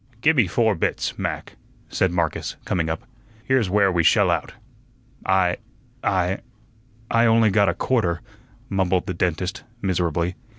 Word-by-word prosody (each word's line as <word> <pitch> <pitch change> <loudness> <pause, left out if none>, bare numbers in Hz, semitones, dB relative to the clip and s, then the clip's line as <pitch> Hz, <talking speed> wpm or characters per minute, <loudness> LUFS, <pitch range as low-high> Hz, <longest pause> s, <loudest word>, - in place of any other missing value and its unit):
"Gi' 160 - +5
me 125 - +3
four 110 +4 +2
bits, 80 - -1
Mac," - - -4 0.3
said 95 - +1
Marcus, 85 -3 -1
coming 80 -3 0
up. 80 0 -3 0.4
"Here's 125 -5 +2
where 100 0 +3
we 85 -1 +2
shell - - +4
out." - - -2 0.7
"I 95 -2 +3 0.5
I 95 0 +1 0.7
I 115 0 +4
only 115 -1 +4
got 100 -1 +4
a 85 - -1
quarter," 90 -10 0 0.5
mumbled 95 -2 +1
the 95 - -3
dentist, 90 +1 -2 0.2
miserably. 90 -3 0
95 Hz, 140 wpm, -23 LUFS, 85-105 Hz, 0.7 s, Gi